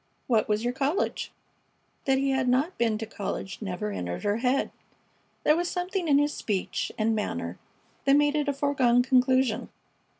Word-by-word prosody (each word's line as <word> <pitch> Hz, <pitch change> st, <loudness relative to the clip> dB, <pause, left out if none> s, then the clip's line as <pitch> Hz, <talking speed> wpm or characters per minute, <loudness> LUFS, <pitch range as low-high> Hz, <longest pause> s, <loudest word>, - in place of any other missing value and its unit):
"What 225 Hz, -4 st, +2 dB
was 210 Hz, +1 st, +1 dB
your 245 Hz, +1 st, 0 dB
college?" 280 Hz, +7 st, -1 dB, 0.7 s
That 270 Hz, -1 st, +3 dB
he 275 Hz, 0 st, +1 dB
had 265 Hz, -1 st, +1 dB
not 275 Hz, +9 st, +1 dB
been 225 Hz, -2 st, +2 dB
to 225 Hz, -, -4 dB
college 200 Hz, -3 st, -5 dB
never 205 Hz, +1 st, -3 dB
entered 90 Hz, -, -4 dB
her 205 Hz, +1 st, +1 dB
head. 255 Hz, +3 st, +1 dB, 0.7 s
There 300 Hz, -, +5 dB
was 350 Hz, +1 st, -1 dB
something 360 Hz, 0 st, -2 dB
in 285 Hz, -2 st, +5 dB
his 290 Hz, +1 st, +2 dB
speech 200 Hz, -4 st, -2 dB
and 220 Hz, 0 st, +1 dB
manner 210 Hz, -, -3 dB, 0.5 s
that 275 Hz, 0 st, +5 dB
made 295 Hz, 0 st, +3 dB
it 300 Hz, -1 st, 0 dB
a -, -, +1 dB
foregone 265 Hz, -4 st, +3 dB
conclusion. 255 Hz, -2 st, +2 dB
255 Hz, 170 wpm, -27 LUFS, 220-285 Hz, 0.7 s, There